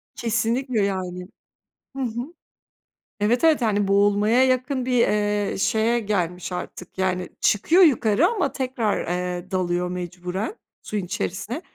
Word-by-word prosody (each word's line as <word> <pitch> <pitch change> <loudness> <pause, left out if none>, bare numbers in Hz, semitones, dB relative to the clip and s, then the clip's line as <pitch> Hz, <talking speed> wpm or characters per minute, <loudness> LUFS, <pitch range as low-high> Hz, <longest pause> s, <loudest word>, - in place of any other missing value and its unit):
Kesinlikle, 230 +1 0
yani. 185 -2 -2 0.7
Hı 270 - -2
hı. 245 +7 -4 0.9
Evet, 230 +7 +1
evet, 315 -4 +4
hani, 205 -3 +1
boğulmaya 205 +5 +3
yakın 255 0 0
bir, 250 -2 +2
eee, 205 -1 0
şeye 225 +3 +2
gelmiş 180 -4 -2
artık. 180 0 -7
Yani, 185 -1 -1
çıkıyor 325 - +4
yukarı 250 - +4
ama 415 -3 0
tekrar, 250 -8 -1
eee, 180 +1 -3
dalıyor 180 -1 0
mecburen 180 - -4 0.3
suyun 210 -3 -3
içerisine, 205 - -4
210 Hz, 125 wpm, -23 LUFS, 185-250 Hz, 0.9 s, evet